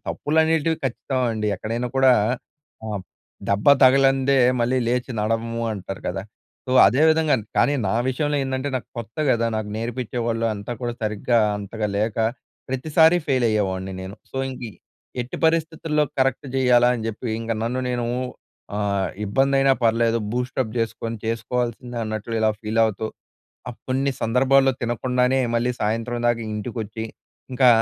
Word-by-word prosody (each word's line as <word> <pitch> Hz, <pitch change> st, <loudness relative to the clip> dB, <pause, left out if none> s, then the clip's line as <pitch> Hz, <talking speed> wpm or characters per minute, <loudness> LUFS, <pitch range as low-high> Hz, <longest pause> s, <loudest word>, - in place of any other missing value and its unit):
తప్పులనేటివి, 160 Hz, +1 st, +1 dB
ఖచ్చితం 130 Hz, +1 st, -2 dB
అండి. 110 Hz, -1 st, -2 dB
ఎక్కడైనా 115 Hz, +5 st, -3 dB
కూడా 135 Hz, -1 st, +6 dB, 0.7 s
ఆహ్, 105 Hz, -3 st, -4 dB, 0.5 s
దెబ్బ 100 Hz, +1 st, 0 dB, 0.2 s
తగలందే, 135 Hz, +1 st, +5 dB, 0.2 s
మళ్ళీ 125 Hz, +2 st, +2 dB
లేచి 125 Hz, +2 st, -1 dB
నడవము 115 Hz, +2 st, -1 dB
అంటారు 95 Hz, -1 st, -6 dB
కదా! 95 Hz, +2 st, -3 dB, 0.4 s
సో, -, -, -4 dB, 0.2 s
అదే 135 Hz, +5 st, +3 dB
విధంగా 160 Hz, -1 st, +3 dB, 0.2 s
కానీ, 145 Hz, -, +4 dB
నా -, -, 0 dB, 0.2 s
విషయంలో 145 Hz, +3 st, 0 dB
ఏందంటే, 130 Hz, +1 st, -2 dB
నాకు 125 Hz, -, -7 dB
కొత్త 115 Hz, -1 st, -8 dB
కదా! 115 Hz, -2 st, +2 dB
నాకు 110 Hz, -1 st, -3 dB
నేర్పించేవాళ్ళు 115 Hz, 0 st, -2 dB
అంతా 100 Hz, +3 st, -6 dB
కూడా 120 Hz, -1 st, -2 dB
సరిగ్గా 110 Hz, +2 st, +1 dB, 0.2 s
అంతగా 105 Hz, +2 st, -3 dB
లేక, 105 Hz, +1 st, -1 dB, 0.5 s
ప్రతిసారి 155 Hz, +6 st, +4 dB
ఫెయిల్ 130 Hz, -4 st, +2 dB
అయ్యేవాడిని 95 Hz, -3 st, -1 dB
నేను. 95 Hz, +3 st, -8 dB
సో, -, -, -9 dB
ఇంక 130 Hz, -, -7 dB, 0.6 s
ఎట్టి 120 Hz, -, -7 dB
పరిస్థితుల్లో 160 Hz, -1 st, +1 dB
కరెక్ట్ 135 Hz, +1 st, +1 dB
చేయాలా 125 Hz, -2 st, +5 dB
అని 110 Hz, -, -5 dB
చెప్పి, 115 Hz, +2 st, -5 dB
ఇంక 115 Hz, 0 st, -2 dB
నన్ను 125 Hz, +2 st, -2 dB
నేను 120 Hz, -1 st, -1 dB, 0.7 s
ఆహ్, 100 Hz, -2 st, 0 dB, 0.2 s
ఇబ్బంది 135 Hz, +7 st, +2 dB
అయినా 135 Hz, 0 st, +5 dB
పర్లేదు, 115 Hz, 0 st, +3 dB
బూస్ట్ 125 Hz, +2 st, -3 dB
అ‌ప్ 110 Hz, -, -7 dB
చేసుకొని 115 Hz, 0 st, -2 dB
చేసుకోవాల్సిందే, 120 Hz, +1 st, -2 dB
అన్నట్లు 110 Hz, +1 st, -4 dB
ఇలా 110 Hz, 0 st, +3 dB
ఫీల్ 110 Hz, +1 st, -2 dB
అవుతూ, 110 Hz, 0 st, -2 dB, 0.6 s
అప్పున్నించి 120 Hz, +2 st, -12 dB
కొన్ని 135 Hz, +2 st, +1 dB
సందర్భాల్లో 135 Hz, +3 st, +4 dB
తినకుండానే, 125 Hz, +2 st, +1 dB, 0.2 s
మళ్ళీ 120 Hz, +1 st, +1 dB
సాయంత్రం 115 Hz, +3 st, -1 dB
దాకా 120 Hz, -1 st, +2 dB
ఇంటికి 105 Hz, +3 st, -5 dB
వచ్చి 110 Hz, +1 st, -6 dB, 0.5 s
ఇంకా, 125 Hz, 0 st, +5 dB
120 Hz, 145 wpm, -23 LUFS, 110-130 Hz, 0.7 s, కూడా